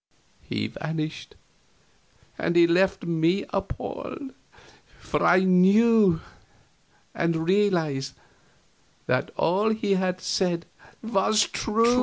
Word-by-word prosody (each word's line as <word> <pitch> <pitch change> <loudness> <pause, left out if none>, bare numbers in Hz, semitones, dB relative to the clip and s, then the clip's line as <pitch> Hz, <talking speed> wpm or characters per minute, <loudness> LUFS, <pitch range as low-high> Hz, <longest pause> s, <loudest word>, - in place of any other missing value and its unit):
He - - -4
vanished, 155 -1 -5 1.0
and 170 - -2 0.2
left 190 +2 +2
me 170 +3 0
appalled; 270 -2 -5 0.6
for - - -3
I 180 +1 +5
knew, 190 0 +4 0.9
and 165 -1 -1
realized, 165 -9 +1 0.9
that - - 0
all 195 +6 +1
he 215 -2 0
had 185 -1 -1
said 175 -3 -1 0.4
was 215 -1 +2
true. 230 +2 +1
185 Hz, 90 wpm, -25 LUFS, 170-210 Hz, 1.0 s, I